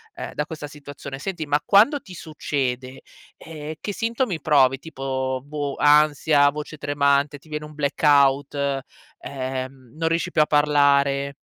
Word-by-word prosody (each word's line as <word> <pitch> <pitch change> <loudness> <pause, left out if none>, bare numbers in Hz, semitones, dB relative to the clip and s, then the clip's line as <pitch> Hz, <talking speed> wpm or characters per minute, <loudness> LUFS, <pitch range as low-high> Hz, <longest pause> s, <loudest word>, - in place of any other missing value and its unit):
ehm, - - -7
da 150 - -2
questa 155 -2 -7
situazione. 145 -1 -9
Senti, 175 0 -4
ma 145 0 +1
quando 230 +9 +4
ti 185 - -13
succede, 135 -5 -4 0.4
ehm, 155 -1 -8
che 205 - -4
sintomi 230 - -2
provi? 135 -3 +3
Tipo, 130 -3 -4
boh, 145 -1 -4
ansia? 150 -1 +4
Voce 150 +1 -7
tremante? 145 0 +1
Ti 140 - -23
viene 150 0 -4
un 150 - -12
blackout? 140 -1 +2
E 140 -1 -1 0.4
ehm, 130 -1 -6
non 165 0 0
riesci 170 +2 -1
più 155 - +3
a - - +5
parlare? 140 -2 +2
145 Hz, 150 wpm, -23 LUFS, 140-155 Hz, 0.4 s, a